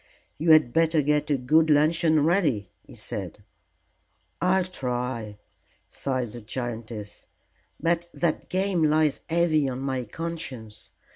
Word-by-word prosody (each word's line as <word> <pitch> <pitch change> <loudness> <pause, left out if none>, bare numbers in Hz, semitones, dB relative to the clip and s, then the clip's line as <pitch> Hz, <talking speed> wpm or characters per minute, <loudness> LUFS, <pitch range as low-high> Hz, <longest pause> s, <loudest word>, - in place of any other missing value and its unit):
"You 165 +2 0
had 155 -6 +6
better 160 -2 +3
get 150 +1 +1
a 145 - +2
good 155 +5 +3
luncheon 155 +1 +3
ready," 150 - +1
he - - -15
said. 105 - -7 1.0
"I'll 185 +1 +3
try," 125 - -4 0.5
sighed 130 -4 -3
the 120 - -9
giantess; 110 -2 -6 0.5
"but 170 +1 0
that 170 -3 -1
game 190 -1 0
lies 155 -1 +2
heavy 160 -4 +2
on 125 0 -4
my 130 -2 -2
conscience. 130 -6 -7
150 Hz, 125 wpm, -26 LUFS, 125-165 Hz, 1.0 s, had